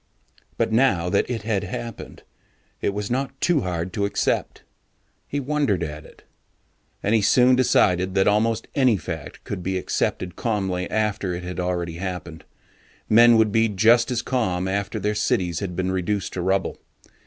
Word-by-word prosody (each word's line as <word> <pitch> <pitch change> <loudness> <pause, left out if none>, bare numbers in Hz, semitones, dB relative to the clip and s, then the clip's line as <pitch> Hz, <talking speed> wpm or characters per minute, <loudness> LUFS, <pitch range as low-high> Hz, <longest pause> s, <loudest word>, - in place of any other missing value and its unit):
But - - 0
now 110 -8 +2
that - - +1
it 115 -4 -3
had 105 -2 -1
happened, 115 +3 -7 0.6
it - - +1
was 105 +2 -4
not 135 +1 -2
to 170 -5 +2
hard 90 -1 -3
to 100 - 0
accept. 100 - -1 0.6
He 145 - -2
wondered 140 - 0
at 75 -1 -6
it. - - -18 0.8
And 105 - +1
he 110 - +4
soon 125 +5 +5
decided 95 -7 +2
that 95 - +3
almost 110 +2 +1
any 130 -6 +3
fact 80 - -7
could - - -5
be 95 +1 -2
accepted 90 -1 -2
calmly 95 -5 -2
after 105 -4 -1
it 90 - -6
had 90 +1 -5
already 90 -2 -2
happened. 90 -3 -6 0.6
Men 115 +1 +7
would 110 -1 +3
be 115 +1 +3
just 115 +4 +4
as 120 -1 -1
calm 95 -8 -1
after 100 +2 -2
their 105 +1 0
cities 90 -5 0
had 90 -3 -4
been 95 +1 -1
reduced 95 +2 -2
to 90 - -3
rubble. 95 +1 0
100 Hz, 165 wpm, -23 LUFS, 90-115 Hz, 0.8 s, Men